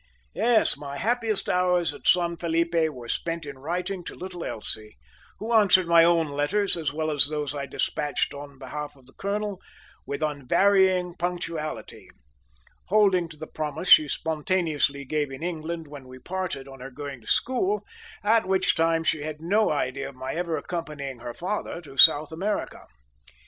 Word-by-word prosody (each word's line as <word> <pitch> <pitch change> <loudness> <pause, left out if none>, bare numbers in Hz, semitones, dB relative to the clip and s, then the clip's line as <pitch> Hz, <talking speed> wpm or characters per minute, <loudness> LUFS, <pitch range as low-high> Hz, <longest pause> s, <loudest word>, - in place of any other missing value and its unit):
Yes, 230 -8 +3
my 140 -1 -7
happiest 225 - 0
hours 180 -3 +2
at - - -8
San 170 -1 +4
Felipe 170 0 0 0.2
were 125 -5 -10
spent 165 +5 -3
in 140 -2 -8
writing 180 +5 -3
to - - -7
little 180 -2 -7
Elsie, 110 - -6 0.4
who 225 +3 -3
answered 195 -5 +5
my 170 -1 +7
own 165 -2 +3
letters, 145 +9 0
as 160 -5 -2
well 155 +1 -2
as 145 -1 +4
those 150 -1 -3
I 140 -1 -4
despatched 145 0 -1
on 140 -1 -9
behalf 150 +1 -6
of 135 -2 -21
the 135 - -19
colonel, 205 -1 -3 0.5
with 140 +2 -3
unvarying 180 +5 +2
punctuality, 170 -3 -4 0.8
holding 190 -4 +3
to 155 - -12
the 155 - -7
promise 155 +3 -4
she 155 - +9
spontaneously 155 -3 0
gave 150 +1 -1
in 135 +4 -8
England 165 -1 -4
when 145 -3 -11
we 130 0 -11
parted 175 -3 -4
on 135 -1 -11
her 130 +1 -7
going 140 -1 -8
to - - -19
school, 375 - +1 0.4
at 220 -1 +3
which 185 -2 +2
time 165 0 +1
she 155 0 +1
had 155 0 -5
no 200 +7 +2
idea 135 -2 -2
of 140 - -14
my 130 +1 -5
ever 170 -1 -2
accompanying 150 -7 -5
her 120 0 -7
father 185 -1 -3
to 140 -5 -13
South 145 +3 +8
America. 195 +6 -3
160 Hz, 170 wpm, -26 LUFS, 145-180 Hz, 0.8 s, she